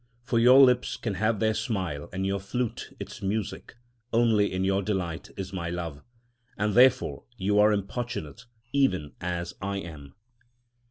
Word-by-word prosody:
For 120 -1 +1
your 125 +3 +7
lips 125 -2 +4
can 110 - -3
have 110 +2 0
their 110 +1 +2
smile, 95 - -3
and 95 +1 -2
your 100 0 0
flute 120 +4 -3
its - - -8
music, 100 +2 -3 0.4
only 115 -3 +3
in 95 0 -1
your 95 +1 +2
delight 90 -5 -3
in 95 - -3
my 85 -2 -3
love; 85 -4 -5 0.6
and 105 0 0
therefore 130 +2 +4
you 100 +1 +2
are 105 +1 +6
importunate, 105 - -4 0.3
even 95 - +1
as 85 -1 -3
I 100 +1 -2
am. 75 -7 -9
100 Hz, 155 wpm, -27 LUFS, 90-115 Hz, 0.6 s, your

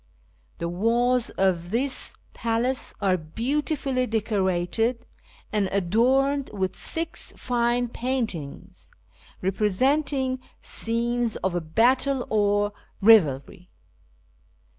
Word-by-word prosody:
The 170 - -3
walls 235 +7 +1
of 175 -3 +1
this 255 +6 +1 0.2
palace 235 +3 -1
are 190 -2 +2
beautifully 255 - -1
decorated, 215 +1 0 0.5
and 205 -3 +1
adorned 255 +9 +2
with 190 -2 -2
six 330 0 -2
fine 245 0 0
paint 245 -1 -2
ings 145 -4 -10 0.5
representing 260 +7 +1 0.2
scenes 235 0 -1
of 175 -4 -3
battle 255 +3 +3
or 205 -1 +2 0.3
revelry. 180 -5 +4
230 Hz, 85 wpm, -25 LUFS, 190-255 Hz, 0.5 s, revelry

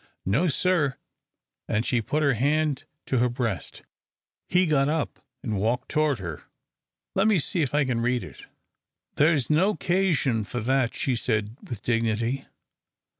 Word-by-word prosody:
"No, 125 - +2
sir," 150 -4 +1 0.7
and 110 +3 0
she 120 -3 +1
put 150 +7 -1
her 140 -2 +4
hand 145 +3 +1 0.2
to 130 - +1
her 125 +1 +3
breast. 120 -6 -3 0.6
He 180 +1 +3
got 145 -3 +2
up 155 -1 -2 0.2
and 110 -5 -2
walked 115 +4 0
toward 155 -3 +2
her. 85 -6 -7 0.7
"Let 195 +3 +3
me 215 -3 +4
see 170 +2 0
if 145 -2 0
I 150 -1 +3
can 120 -3 -1
read 125 +1 +1
it." - - -11 0.7
"There's 150 -3 +3
no 190 +7 +3
'casion 175 - +1
for 120 +4 -4
that," 130 +1 +1
she 130 - 0
said, 110 -2 -1
with 110 -5 -8
dignity. 115 +2 0
130 Hz, 155 wpm, -26 LUFS, 115-155 Hz, 0.7 s, her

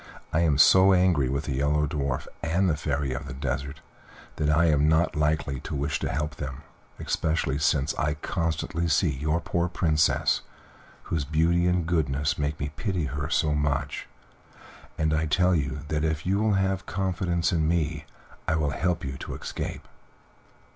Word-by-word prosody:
I 80 - +3
am 80 -5 +3
so 95 +6 +7
angry 90 -8 +3
with 70 +3 -1
the - - -4
Yellow 75 +3 +1
Dwarf 70 -4 -2 0.2
and 85 +4 +1
the 80 - +2
Fairy 70 -2 -2
of 70 +3 -5
the 65 - -6
Desert 70 +2 -4 0.6
that 75 -1 0
I 80 +2 +4
am 75 -2 +3
not 80 +3 +2
likely 75 -3 0
to - - -6
wish 70 0 -1
to - - -2
help 75 +2 -3
them, 70 +1 -6 0.4
especially 80 -3 -1
since 75 -1 +1
I 75 0 0
constantly 85 +2 -2
see 80 +1 +2
your 75 +4 -1
poor 85 +2 -1
Princess, 80 -3 +2 0.6
whose 80 -3 -2
beauty 80 +4 +2
and 90 -2 +1
goodness 75 -4 0
make 75 0 -2
me 70 - -2
pity 90 +1 -2
her 70 +2 -3
so 75 -2 +2
much; 75 -1 -1 0.9
and 80 -1 +1
I 80 0 +1
tell 90 +4 +3
you 70 -3 -1
that 75 -1 0
if 80 -1 -1
you 95 +2 +1
will 110 -1 +2
have 95 -1 0
confidence 90 -3 -1
in 80 -2 +1
me 80 -2 -1 0.4
I 80 - +2
will 75 -3 0
help 90 +2 -1
you 65 0 -5
to - - -6
escape." - - -6
75 Hz, 175 wpm, -26 LUFS, 70-85 Hz, 0.9 s, so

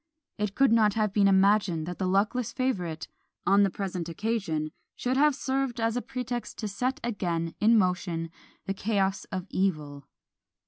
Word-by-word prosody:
It 210 -1 -2
could 270 -2 +4
not 215 -3 +4
have 215 -3 +1
been 200 -1 +4
imagined 195 -4 +3
that 180 +1 -6
the 185 - 0
luckless 210 +5 +1
favourite, 180 - -2 0.4
on 200 +1 +5
the 200 - +4
present 180 -3 -4
occasion, 165 -5 -2 0.2
should 250 +1 -1
have 295 +1 +4
served 265 -3 -1
as 225 0 +1
a 245 - 0
pretext 245 -3 -5
to 215 - -3
set 250 +6 -2
again 170 -7 -2
in 225 +2 +5
motion 180 -4 0 0.3
the 195 - -1
chaos 195 -1 0
of 185 -1 -5
evil! 150 -7 -2
200 Hz, 165 wpm, -28 LUFS, 180-230 Hz, 0.4 s, on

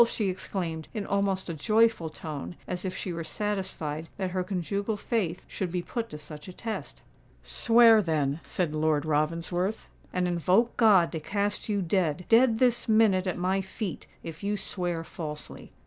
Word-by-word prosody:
she 215 -4 -1
exclaimed, 170 -4 -4
in 210 -2 -2
almost 200 -1 0
a 170 - -3
joyful 215 +1 +2
tone, 155 +1 -6
as 180 0 -3
if 185 - -3
she 180 - -3
were 165 0 -4
satisfied 165 -5 -3
that 190 -2 -2
her 185 0 0
conjugal 200 +3 -2
faith 195 -6 -1
should 185 -3 -3
be 180 0 -2
put 230 +3 -4
to 150 - -7
such 150 +1 -10
a 185 - -8
test. 220 +3 -6 0.4
"Swear, 230 -2 +6
then," 155 -5 0
said 170 -5 -2
Lord 155 -1 +1
Ravensworth; 165 +6 0 0.3
"and 180 0 0
invoke 180 +7 +2
God 200 -7 +5
to 165 - -3
cast 205 +6 -2
you 200 -2 +1
dead—dead 190 - +3
this 245 -1 +2
minute 210 -4 +4
at 185 - -1
my 185 +2 +1
feet—if 190 -4 -7
you 205 +1 0
swear 175 -4 -2
falsely." 150 -2 -7
185 Hz, 165 wpm, -28 LUFS, 165-210 Hz, 0.4 s, Swear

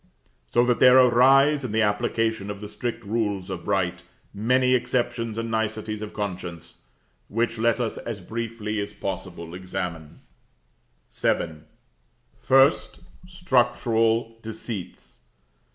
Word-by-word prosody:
So 120 - +4
that 125 -1 +1
there 125 0 +7
arise, 135 +4 +5
in 125 - -4
the 110 0 +3
application 110 0 0
of 100 -1 -5
the 105 - -7
strict 115 0 -5
rules 100 -3 -2
of 90 -2 -6
right, 90 -3 0 0.3
many 125 +5 +2
exceptions 120 -3 -1
and 115 0 -3
niceties 110 -1 -2
of 105 - -6
conscience; 90 - -6 0.4
which 115 +1 -1
let 115 +1 +2
us 115 -3 -2
as 115 -3 -6
briefly 110 +1 -4
as 100 0 -4
possible 90 -4 -6
examine. 90 -4 -6 0.9
VII. 80 -3 -2 0.8
1st. 135 +3 +4 0.3
Structural 120 -8 +1
Deceits. 105 - -7
110 Hz, 120 wpm, -25 LUFS, 100-120 Hz, 0.9 s, there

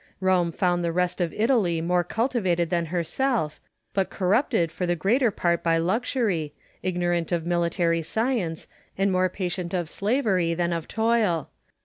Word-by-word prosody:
Rome 185 -2 +2
found 175 0 0
the 170 - 0
rest 180 +1 0
of 170 -2 0
Italy 215 -7 +2
more 175 +2 +1
cultivated 185 -6 0
than 170 -2 0
herself, 175 - -1 0.3
but 195 -2 0
corrupted 185 - +1
for 180 +1 -3
the 175 - +1
greater 230 - +2
part 170 -4 0
by 165 -1 +2
luxury, 185 - 0 0.3
ignorant 175 -2 -1
of 170 -2 0
military 170 -1 +1
science, 210 -2 -1 0.3
and 195 0 +2
more 185 0 +2
patient 180 -1 -3
of 175 -3 -1
slavery 200 -7 +1
than 170 0 0
of 165 -2 -4
toil. 220 -8 +1
180 Hz, 150 wpm, -25 LUFS, 170-205 Hz, 0.3 s, Rome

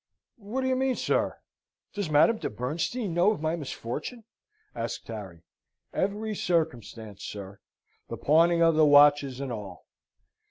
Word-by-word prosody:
"What 225 +4 -4
do 260 - -1
you 260 - +2
mean, 260 0 +1
sir? - - 0 0.6
Does 205 -5 -3
Madame 155 +10 +4
de - - -3
Bernstein 165 - -3
know 175 +4 +4
of 215 - -1
my 160 +2 -1
misfortune?" 150 - -6 0.5
asked - - -5
Harry. 95 -7 -8 0.5
"Every 210 +3 -1
circumstance, 120 - -2
sir; 100 -1 -8 0.5
the - - -5
pawning 170 +3 +3
the 165 -2 +5
watches, 145 -2 +5
and 135 -2 -4
all." 100 -5 -8
155 Hz, 135 wpm, -27 LUFS, 120-200 Hz, 0.6 s, the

